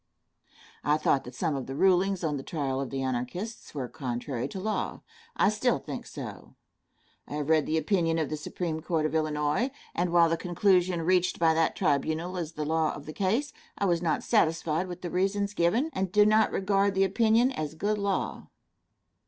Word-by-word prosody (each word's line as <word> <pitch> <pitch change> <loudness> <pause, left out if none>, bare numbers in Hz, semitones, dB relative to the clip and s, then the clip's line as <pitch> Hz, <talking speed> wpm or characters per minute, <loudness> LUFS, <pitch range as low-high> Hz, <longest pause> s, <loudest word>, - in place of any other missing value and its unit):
I 150 +1 +3
thought 140 -3 +1
that 125 +1 -9
some 160 +1 -1
of 135 -2 -4
the 135 - -5
rulings 190 +2 +3
on 155 -2 0
the - - -5
trial 135 -3 -2
of 135 - -4
the 135 -1 -3
Anarchists 130 - -4
were 130 -3 -3
contrary 125 -2 -4
to 190 - -7
law. 215 +3 -2 0.3
I - - +3
think - - -1
so - - -10
still. - - -8 0.7
I - - -8
have 150 0 -3
read 155 -2 +3
the 160 - +1
opinion 165 0 +1
of 160 -2 0
the - - 0
Supreme 160 +1 -4
Court 160 -2 0
of 155 - -1
Illinois, 155 - 0 0.2
and 175 0 0
while 170 -1 +6
the 165 0 0
conclusion 180 0 +2
reached 180 +1 +2
by 165 -1 +4
that 165 0 +1
tribunal 160 +5 0
is 165 -3 -4
the 150 -1 -3
law 160 0 +1
of 145 - -10
that 155 - -7
case, 220 - 0 0.2
I 200 - 0
was 170 -3 +2
not 165 -3 0
satisfied 165 -4 +1
with 180 0 -8
the 175 - -4
reasons 200 +2 0
given, 215 - +1
and 190 -1 -2
do 210 +1 +5
not 215 +1 +4
regard 195 0 +1
the 190 - +4
opinion 225 +5 +3
as 155 - -4
good 205 +5 -1
law. 200 -1 -2
170 Hz, 195 wpm, -28 LUFS, 150-195 Hz, 0.7 s, while